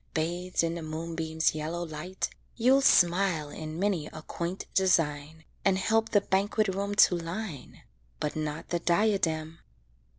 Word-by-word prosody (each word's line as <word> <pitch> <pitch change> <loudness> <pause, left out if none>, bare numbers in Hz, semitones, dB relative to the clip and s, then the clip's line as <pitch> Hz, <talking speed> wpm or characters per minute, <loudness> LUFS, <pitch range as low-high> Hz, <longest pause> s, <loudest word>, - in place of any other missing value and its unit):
Bathed 175 +3 -1
in 165 0 0
the 170 - -5
moonbeam's 160 0 -1
yellow 160 +3 -3
light, 170 +4 -4 0.2
You'll 255 +4 +4
smile 175 - +3
in 155 +1 -7
many 185 -5 0
a 155 - -10
quaint 175 +4 -4
design, 160 -4 +1 0.2
And 195 -1 +3
help 225 +3 +1
the 205 - +3
banquet 200 +2 +1
room 200 +2 -2
to 185 - +6
line 170 - -6 0.4
But 150 - -2
not 155 0 -4
the 175 - 0
diadem. 170 -4 +1
170 Hz, 140 wpm, -28 LUFS, 160-195 Hz, 0.4 s, to